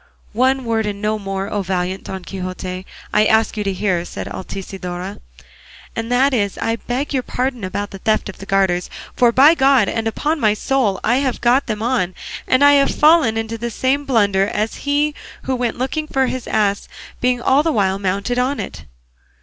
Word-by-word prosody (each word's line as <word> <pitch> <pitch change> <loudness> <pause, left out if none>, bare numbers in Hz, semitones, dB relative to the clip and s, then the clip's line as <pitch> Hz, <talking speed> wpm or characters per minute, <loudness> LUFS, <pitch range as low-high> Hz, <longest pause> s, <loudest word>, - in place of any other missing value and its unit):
"One 260 +3 +2
word 225 -2 0
and 200 -1 -4
no 215 +1 -1
more, 195 -1 -3
O 205 -1 -2
valiant 185 0 -2
Don 190 -1 -6
Quixote, 185 0 -6 0.3
I 210 0 +4
ask 220 0 +2
you 210 - -2
to 200 - -1
hear," 185 -2 0
said - - -7
Altisidora, 190 -1 -6 0.8
"and 225 +1 -3
that 265 +3 +3
is 205 -5 0
that - - -5
I 225 - 0
beg 255 +6 -3
your 265 - +1
pardon 250 -2 -3
about 200 +2 -3
the 195 - -8
theft 215 +2 0
of 195 - -9
the 195 - -9
garters; 190 -2 +1 0.3
for 240 -1 +4
by 275 +6 +7
God 270 -7 +4
and 225 0 -1
upon 300 +8 -1
my 215 -4 +3
soul 225 -5 0
I 240 +3 +3
have 265 -3 -1
got 250 +3 +2
them 215 -1 -3
on, 230 -7 0 0.3
and 255 +2 +3
I 285 0 +7
have 280 -1 +4
fallen 300 -8 +4
into 225 0 -3
the 235 +1 -3
same 265 +5 0
blunder 200 -6 +2
as 215 +2 -2 0.2
he 295 +1 +2
did - - -24 0.3
who 260 - -1
went 245 -2 -2
looking 285 +5 -2
for 265 -3 +1
his 255 -1 -4
ass 205 -2 0 0.3
being 250 0 +1
all 265 +3 +3
the 325 +1 0
while 195 -6 +1
mounted 200 +5 -1
on 265 +3 0
it." - - -7
225 Hz, 205 wpm, -19 LUFS, 195-260 Hz, 0.8 s, by